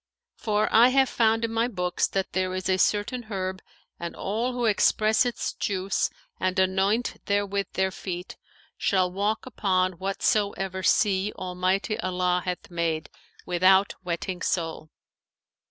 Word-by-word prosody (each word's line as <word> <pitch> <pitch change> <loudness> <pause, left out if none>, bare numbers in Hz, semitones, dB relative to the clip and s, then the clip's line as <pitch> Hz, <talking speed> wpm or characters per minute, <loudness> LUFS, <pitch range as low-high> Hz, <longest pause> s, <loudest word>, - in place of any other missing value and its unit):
For 215 -1 0
I 230 +2 +8
have 265 0 +3
found 225 0 +2
in 225 - -4
my 230 +1 +2
books 180 -6 -1
that 195 -1 -3
there 185 0 0
is 185 0 -3
a 190 0 +2
certain 210 +6 +1
herb 190 -2 -3 0.4
and 170 0 -5
all 225 +6 -2
who 245 -1 -1
express 215 +2 +3
its 240 - -3
juice 195 -1 -1 0.3
and 185 +1 0
anoint 190 +5 +1
therewith 200 -1 0
their 190 0 +1
feet 180 -1 -6 0.4
shall 185 -2 +2
walk 205 +4 -1
upon 185 -7 0
whatsoever 195 -1 0
sea 195 +1 +2
Almighty 185 +4 -1
Allah 180 -1 0
hath 180 0 -5
made, 165 -2 -2 0.3
without 190 +2 +4
wetting 180 +1 -3
sole. 165 -2 -2
190 Hz, 140 wpm, -26 LUFS, 185-215 Hz, 0.4 s, I